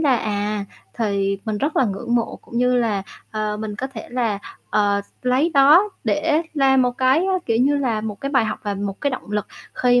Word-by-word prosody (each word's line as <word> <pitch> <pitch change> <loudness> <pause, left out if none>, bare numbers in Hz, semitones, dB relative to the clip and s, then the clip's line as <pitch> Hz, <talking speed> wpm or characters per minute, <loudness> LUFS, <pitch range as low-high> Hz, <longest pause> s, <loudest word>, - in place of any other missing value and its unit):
là, 275 -6 +4
à, 205 -1 -2 0.3
thì 200 -3 0
mình 215 -2 -2
rất 290 +7 -1
là 260 - +4
ngưỡng 210 +3 -2
mộ 235 - -1
cũng 235 - -5
như 250 0 +3
là, 220 -5 +1 0.3
ờ, 215 -1 -2
mình 210 -1 -5
có 260 - -3
thể 255 -5 -9
là, 230 -5 0 0.3
ờ, 205 -1 +2
s - - -26 0.2
lấy 260 +7 +3
đó 300 +9 +7 0.2
để 310 +1 +1
làm 270 -2 +4
một 250 - +2
cái, 260 +2 +4
à, 385 - +1
kiểu 225 -1 +2
như, 275 +4 +3
là 245 -6 0
một 215 -2 -5
cái 275 - -3
bài 260 -5 +3
học 215 - -3
và 205 -1 -2
một 200 0 -4
cái 285 - +1
động 255 -5 -6
lực 210 0 -1 0.3
khi 245 -1 +3
235 Hz, 230 wpm, -21 LUFS, 210-265 Hz, 0.3 s, đó